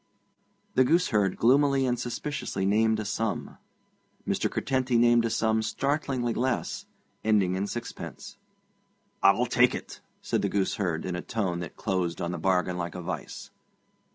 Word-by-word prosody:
The 130 Hz, -, +5 dB
gooseherd 125 Hz, -, +2 dB
gloomily 135 Hz, +2 st, +4 dB
and 125 Hz, -1 st, 0 dB
suspiciously 120 Hz, -5 st, -3 dB
named 110 Hz, +2 st, +3 dB
a 110 Hz, -, -3 dB
sum. 110 Hz, +1 st, -3 dB, 0.7 s
Mr. -, -, 0 dB
Curtenty 130 Hz, -2 st, 0 dB
named 120 Hz, 0 st, +5 dB
a -, -, +1 dB
sum 110 Hz, 0 st, +1 dB
startlingly 130 Hz, +1 st, -1 dB
less, 125 Hz, +1 st, -2 dB, 0.4 s
ending 105 Hz, -4 st, +3 dB
in 95 Hz, +2 st, -1 dB
sixpence. 120 Hz, +3 st, -7 dB, 0.8 s
'I'll -, -, +5 dB
tak' -, -, +3 dB
it,' -, -, -8 dB, 0.2 s
said -, -, -1 dB
the -, -, 0 dB
gooseherd, 95 Hz, -4 st, -1 dB
in 90 Hz, -1 st, -2 dB
a 90 Hz, -, -3 dB
tone 95 Hz, -6 st, -2 dB
that 85 Hz, -2 st, -7 dB
closed 95 Hz, -5 st, -1 dB
on 85 Hz, -, -2 dB
the 85 Hz, -, -4 dB
bargain 90 Hz, 0 st, +1 dB
like 85 Hz, 0 st, -4 dB
a 90 Hz, -, -5 dB
vice. 90 Hz, +2 st, -6 dB
110 Hz, 150 wpm, -27 LUFS, 95-125 Hz, 0.8 s, The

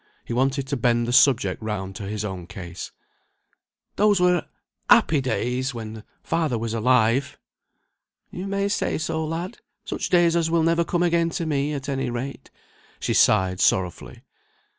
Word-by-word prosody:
He -, -, -4 dB
wanted 135 Hz, +2 st, +1 dB
to 140 Hz, -, -1 dB
bend 120 Hz, -1 st, +1 dB
the 120 Hz, -, -1 dB
subject 120 Hz, -9 st, +4 dB
round 95 Hz, -3 st, -4 dB
to 100 Hz, -, -6 dB
his 105 Hz, +1 st, -3 dB
own 95 Hz, -4 st, -6 dB
case. 90 Hz, -1 st, -8 dB, 1.1 s
"Those 205 Hz, -2 st, +4 dB
were 180 Hz, -1 st, +2 dB, 0.4 s
happy 150 Hz, -3 st, +5 dB
days 130 Hz, 0 st, -2 dB
when 110 Hz, -1 st, -7 dB, 0.2 s
father 160 Hz, -7 st, 0 dB
was 115 Hz, 0 st, -3 dB
alive!" 120 Hz, +2 st, +2 dB, 0.9 s
"You 185 Hz, +2 st, -6 dB
may 200 Hz, 0 st, 0 dB
say 200 Hz, -, -1 dB
so, 160 Hz, 0 st, -2 dB
lad! 170 Hz, +7 st, -4 dB, 0.3 s
Such -, -, -3 dB
days 175 Hz, -2 st, +4 dB
as 165 Hz, -1 st, +1 dB
will 165 Hz, -1 st, +2 dB
never 165 Hz, +1 st, +2 dB
come 175 Hz, +1 st, 0 dB
again 170 Hz, -1 st, +2 dB
to 170 Hz, -, -2 dB
me, 145 Hz, -1 st, -1 dB
at 140 Hz, 0 st, -6 dB
any 135 Hz, -2 st, -2 dB
rate." 125 Hz, +3 st, -6 dB, 0.5 s
She -, -, -1 dB
sighed 95 Hz, -3 st, +3 dB
sorrowfully. 90 Hz, -2 st, 0 dB
135 Hz, 160 wpm, -24 LUFS, 110-165 Hz, 1.1 s, happy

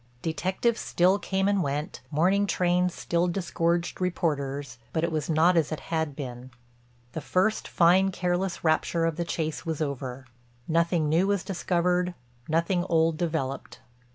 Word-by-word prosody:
Detectives 185 Hz, +8 st, 0 dB
still 185 Hz, +3 st, +2 dB
came 195 Hz, 0 st, 0 dB
and 200 Hz, -1 st, +2 dB
went, 145 Hz, 0 st, -3 dB
morning 185 Hz, +7 st, +2 dB
trains 180 Hz, -1 st, +2 dB
still 170 Hz, 0 st, 0 dB
disgorged 170 Hz, -1 st, -1 dB
reporters, 145 Hz, -8 st, -2 dB
but 160 Hz, -, 0 dB
it 170 Hz, -, 0 dB
was 155 Hz, -1 st, -2 dB
not 165 Hz, +3 st, +4 dB
as 165 Hz, -2 st, +2 dB
it 155 Hz, -, -3 dB
had 160 Hz, -3 st, -1 dB
been. 125 Hz, -2 st, -7 dB, 0.6 s
The 160 Hz, -, -5 dB
first, 190 Hz, +7 st, +1 dB
fine 185 Hz, +3 st, +4 dB
careless 180 Hz, 0 st, -2 dB
rapture 165 Hz, +1 st, +1 dB
of 165 Hz, -2 st, 0 dB
the 170 Hz, -, -2 dB
chase 160 Hz, -2 st, -3 dB
was 160 Hz, -3 st, -3 dB
over; 135 Hz, -3 st, -4 dB, 0.4 s
nothing 170 Hz, -1 st, +2 dB
new 165 Hz, +5 st, +3 dB
was 200 Hz, -2 st, +1 dB
discovered, 180 Hz, -1 st, 0 dB, 0.3 s
nothing 170 Hz, +3 st, +1 dB
old 165 Hz, -1 st, +3 dB
developed. 155 Hz, -6 st, -3 dB
170 Hz, 150 wpm, -27 LUFS, 155-180 Hz, 0.6 s, not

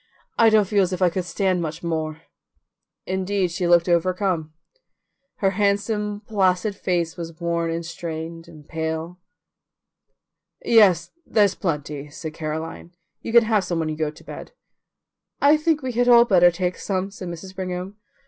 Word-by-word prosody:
I 230 Hz, -1 st, +6 dB
don't 215 Hz, -2 st, +4 dB
feel 205 Hz, 0 st, +2 dB
as 185 Hz, -1 st, +1 dB
if 185 Hz, -, -4 dB
I 180 Hz, -, +4 dB
could 185 Hz, 0 st, -3 dB
stand 185 Hz, 0 st, 0 dB
much 160 Hz, 0 st, -5 dB
more." 160 Hz, -1 st, -3 dB, 0.8 s
Indeed, 190 Hz, 0 st, -1 dB
she 175 Hz, +1 st, -1 dB
looked 170 Hz, 0 st, +4 dB
overcome. 175 Hz, -2 st, 0 dB, 0.8 s
Her 195 Hz, -1 st, +1 dB
handsome 205 Hz, +1 st, 0 dB
placid 200 Hz, -1 st, +1 dB
face 175 Hz, -4 st, -1 dB
was 165 Hz, -1 st, -7 dB
worn 170 Hz, -1 st, -1 dB
and 165 Hz, 0 st, -3 dB
strained 165 Hz, 0 st, -6 dB
and 155 Hz, -3 st, -15 dB
pale. 160 Hz, +2 st, -4 dB, 1.5 s
"Yes, 185 Hz, -8 st, +5 dB
there's 205 Hz, -8 st, +3 dB
plenty," 150 Hz, -5 st, -4 dB
said 160 Hz, +1 st, -7 dB
Caroline; 160 Hz, +2 st, -6 dB, 0.3 s
"you -, -, -5 dB
can 235 Hz, 0 st, +7 dB
have 215 Hz, -3 st, +2 dB
some 180 Hz, -2 st, -2 dB
when 160 Hz, -1 st, -1 dB
you 155 Hz, -, -3 dB
go 155 Hz, -1 st, -1 dB
to 150 Hz, -, -14 dB
bed." -, -, -9 dB, 0.9 s
"I 285 Hz, +2 st, +6 dB
think 305 Hz, -1 st, 0 dB
we 260 Hz, -, -2 dB
had 245 Hz, +1 st, +1 dB
all 235 Hz, -1 st, +8 dB
better 180 Hz, -5 st, +6 dB
take 180 Hz, +1 st, -2 dB
some," 195 Hz, 0 st, -2 dB
said 190 Hz, -2 st, -8 dB
Mrs. 175 Hz, +2 st, -8 dB
Brigham. 185 Hz, +1 st, -5 dB
180 Hz, 160 wpm, -23 LUFS, 165-200 Hz, 1.5 s, all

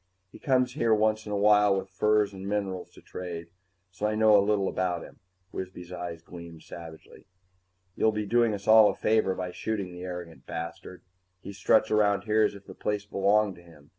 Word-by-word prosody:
He -, -, -13 dB
comes 125 Hz, -2 st, +1 dB
here 115 Hz, -6 st, +2 dB
once 110 Hz, 0 st, +1 dB
in -, -, -5 dB
a 105 Hz, -, 0 dB
while 105 Hz, -1 st, +4 dB
with 95 Hz, 0 st, -5 dB
furs 105 Hz, +1 st, +2 dB
and 95 Hz, +1 st, -7 dB
minerals 95 Hz, -3 st, -3 dB
to -, -, -17 dB
trade, 85 Hz, -2 st, -7 dB, 0.4 s
so 100 Hz, +4 st, -2 dB
I 105 Hz, -, -1 dB
know 110 Hz, -1 st, +5 dB
a 100 Hz, -, +6 dB
little 100 Hz, -1 st, +1 dB
about 90 Hz, -2 st, -2 dB
him." -, -, -14 dB, 0.3 s
Wisby's 90 Hz, -1 st, -7 dB
eyes 85 Hz, -2 st, -6 dB
gleamed 85 Hz, -2 st, -11 dB
savagely. 80 Hz, -2 st, -12 dB, 0.7 s
"You'll 110 Hz, -, +2 dB
be 105 Hz, -1 st, -3 dB
doing 115 Hz, 0 st, +2 dB
us 100 Hz, 0 st, -10 dB
all 110 Hz, -1 st, +8 dB
a -, -, -3 dB
favor 110 Hz, -3 st, +1 dB
by 90 Hz, -1 st, -4 dB
shooting 100 Hz, -1 st, -4 dB
the 90 Hz, 0 st, -10 dB
arrogant 90 Hz, -2 st, -8 dB
bastard. 85 Hz, +2 st, -7 dB, 0.4 s
He 100 Hz, +1 st, -9 dB
struts 110 Hz, +3 st, +2 dB
around 100 Hz, -2 st, +2 dB
here 110 Hz, +1 st, +2 dB
as 105 Hz, -1 st, +2 dB
if 100 Hz, -, -13 dB
the -, -, -10 dB
place 105 Hz, -1 st, -3 dB
belonged 100 Hz, +1 st, +2 dB
to -, -, -14 dB
him. 80 Hz, -4 st, -18 dB
100 Hz, 200 wpm, -27 LUFS, 90-105 Hz, 0.7 s, all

